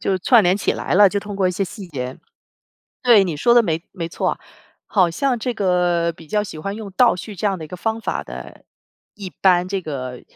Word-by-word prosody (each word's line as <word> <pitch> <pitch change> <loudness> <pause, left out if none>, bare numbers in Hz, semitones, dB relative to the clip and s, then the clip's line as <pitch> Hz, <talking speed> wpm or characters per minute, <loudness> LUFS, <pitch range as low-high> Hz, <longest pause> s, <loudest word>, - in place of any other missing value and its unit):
就 190 - 0
串 225 +4 +5
联 180 +2 +3
起 - - 0
来 - - -2
了， 200 0 +7
就 200 - -1
通 205 0 -7
过 190 -2 +2
一 - - 0
些 195 +2 -1
细 195 +1 -9
节。 130 -4 -5 0.8
对， 225 -6 +6
你 165 -5 -3
说 235 +10 +3
的 240 - +6
没 165 -4 -1
没 170 -3 -5
错， - - -2 0.5
好 185 -5 +2
像 250 +7 0
这 245 +1 -3
个 180 -4 +1
比 160 -1 -15
较 210 -1 +1
喜 160 - -8
欢 195 +6 -4
用 210 -3 -7
倒 245 -4 +4
叙 210 +3 -8
这 205 - -1
样 195 -3 0
的 160 - -7
一 - - -11
个 180 - -7
方 225 +4 -2
法 - - -3
的， - - -10 0.5
一 195 -3 -8
般 180 -1 +2
这 195 -1 -2
个 130 -5 -6
190 Hz, 250 characters per minute, -20 LUFS, 170-210 Hz, 0.8 s, 了